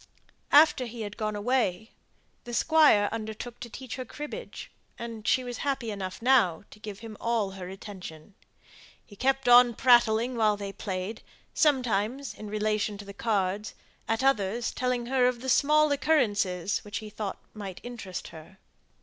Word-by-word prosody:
After 290 Hz, -4 st, +6 dB
he 235 Hz, 0 st, -8 dB
had 205 Hz, -1 st, -5 dB
gone 215 Hz, -1 st, -2 dB
away, 220 Hz, -2 st, 0 dB, 0.5 s
the 240 Hz, 0 st, -5 dB
Squire 300 Hz, -11 st, +5 dB
undertook 225 Hz, +2 st, -6 dB
to 240 Hz, -, -7 dB
teach 255 Hz, +2 st, -7 dB
her 255 Hz, -, -4 dB
cribbage, 295 Hz, -, -8 dB, 0.3 s
and 230 Hz, -2 st, -7 dB
she 255 Hz, -, +3 dB
was 245 Hz, -1 st, -5 dB
happy 270 Hz, -5 st, -2 dB
enough 195 Hz, +1 st, -6 dB
now 230 Hz, -10 st, +4 dB
to 210 Hz, -, -14 dB
give 210 Hz, -2 st, -8 dB
him 225 Hz, -2 st, -8 dB
all 230 Hz, -4 st, 0 dB
her 185 Hz, -2 st, -8 dB
attention. 190 Hz, -3 st, -10 dB, 0.7 s
He 205 Hz, -, -15 dB
kept 270 Hz, +3 st, 0 dB
on 245 Hz, -1 st, +7 dB
prattling 240 Hz, -1 st, +4 dB
while 215 Hz, -2 st, +2 dB
they 200 Hz, -1 st, -6 dB
played; 190 Hz, +3 st, -4 dB, 0.3 s
sometimes 255 Hz, -2 st, +1 dB
in 215 Hz, -, -9 dB
relation 215 Hz, 0 st, -1 dB
to 205 Hz, -, -9 dB
the 200 Hz, -, -9 dB
cards; 205 Hz, -1 st, -1 dB, 0.3 s
at 225 Hz, +3 st, 0 dB
others 235 Hz, -3 st, +1 dB
telling 250 Hz, -1 st, -1 dB
her 255 Hz, 0 st, +3 dB
of 250 Hz, +1 st, -1 dB
small 305 Hz, +2 st, +4 dB
occurrences 210 Hz, -, +1 dB
which 210 Hz, +1 st, -6 dB
he 215 Hz, -1 st, -7 dB
thought 210 Hz, -2 st, -4 dB, 0.2 s
might 200 Hz, -4 st, -7 dB
interest 230 Hz, -7 st, -7 dB
her. 165 Hz, +4 st, -13 dB
225 Hz, 160 wpm, -28 LUFS, 205-250 Hz, 0.7 s, on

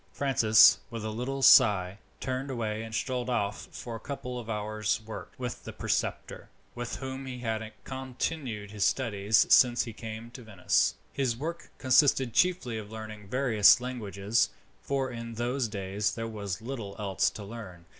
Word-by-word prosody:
Francis, 115 Hz, -6 st, +5 dB
with 115 Hz, -2 st, -6 dB
a 110 Hz, -, -2 dB
little 130 Hz, +5 st, -3 dB
sigh, 100 Hz, -9 st, +6 dB, 0.2 s
turned 130 Hz, +1 st, -3 dB
away 110 Hz, -4 st, -2 dB
and 110 Hz, 0 st, -6 dB
strolled 125 Hz, -1 st, -2 dB
off 105 Hz, -4 st, -1 dB
for 120 Hz, -2 st, -7 dB
a -, -, -6 dB
couple 125 Hz, -1 st, -5 dB
of 115 Hz, -1 st, -9 dB
hours' 105 Hz, 0 st, -1 dB
work 110 Hz, -, -8 dB
with 125 Hz, -1 st, -5 dB
the -, -, -7 dB
preceptor, -, -, -3 dB, 0.2 s
with 120 Hz, 0 st, -5 dB
whom 130 Hz, 0 st, -6 dB
he 125 Hz, -1 st, -5 dB
had 110 Hz, -2 st, -3 dB
continued 130 Hz, -4 st, -4 dB
his 105 Hz, -2 st, -2 dB
studies 105 Hz, -4 st, +2 dB
since 120 Hz, -1 st, +6 dB
he 115 Hz, -, -7 dB
came 110 Hz, +1 st, -8 dB
to 125 Hz, -, -10 dB
Venice. 105 Hz, -6 st, +1 dB, 0.2 s
This 130 Hz, -4 st, 0 dB
work 160 Hz, +7 st, -5 dB
consisted 130 Hz, -2 st, +3 dB
chiefly 170 Hz, -11 st, +1 dB
of 105 Hz, 0 st, -10 dB
learning 110 Hz, -2 st, -8 dB
various 120 Hz, -3 st, +5 dB
languages, 110 Hz, -3 st, -1 dB, 0.3 s
for 135 Hz, -2 st, -1 dB
in 115 Hz, -1 st, -7 dB
those 120 Hz, +2 st, -1 dB
days 100 Hz, 0 st, -2 dB
there 115 Hz, 0 st, -4 dB
was 105 Hz, -2 st, -5 dB
little 115 Hz, -6 st, -6 dB
else 100 Hz, -4 st, +1 dB
to 105 Hz, -, -9 dB
learn. 100 Hz, -5 st, -9 dB
115 Hz, 165 wpm, -29 LUFS, 105-130 Hz, 0.3 s, sigh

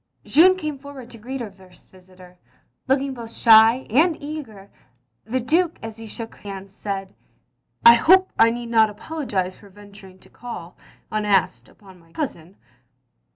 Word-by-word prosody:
Jeanne 365 Hz, +5 st, +5 dB
came 305 Hz, -5 st, -5 dB
forward 270 Hz, -3 st, -11 dB
to 230 Hz, -, -11 dB
greet 255 Hz, +4 st, -6 dB
her 220 Hz, -4 st, -6 dB
first 185 Hz, -2 st, -20 dB
visitor, 185 Hz, -1 st, -18 dB, 0.5 s
looking 270 Hz, +1 st, 0 dB
both 230 Hz, -3 st, -9 dB
shy 225 Hz, +2 st, +5 dB
and 315 Hz, +7 st, +3 dB
eager, 275 Hz, -10 st, -9 dB, 0.5 s
and 220 Hz, -, -18 dB
the -, -, +2 dB
Duke 330 Hz, +7 st, 0 dB
as 225 Hz, 0 st, -7 dB
he 225 Hz, 0 st, -10 dB
shook 225 Hz, +1 st, -8 dB
hands, 195 Hz, -1 st, -9 dB
said, 195 Hz, -2 st, -6 dB, 0.4 s
" -, -, -35 dB
I 235 Hz, -, +11 dB
hope 370 Hz, +10 st, +4 dB
I 225 Hz, -, +6 dB
need 235 Hz, 0 st, -5 dB
not 220 Hz, -2 st, +4 dB
apologise 210 Hz, -, -4 dB
for 205 Hz, -, -16 dB
venturing 200 Hz, -1 st, -15 dB
to -, -, -20 dB
call, 190 Hz, -8 st, -9 dB, 0.4 s
unasked, 195 Hz, -, 0 dB
upon 190 Hz, -3 st, -18 dB
my 165 Hz, -1 st, -24 dB
cousin. 195 Hz, -, -6 dB
225 Hz, 160 wpm, -22 LUFS, 195-265 Hz, 0.5 s, I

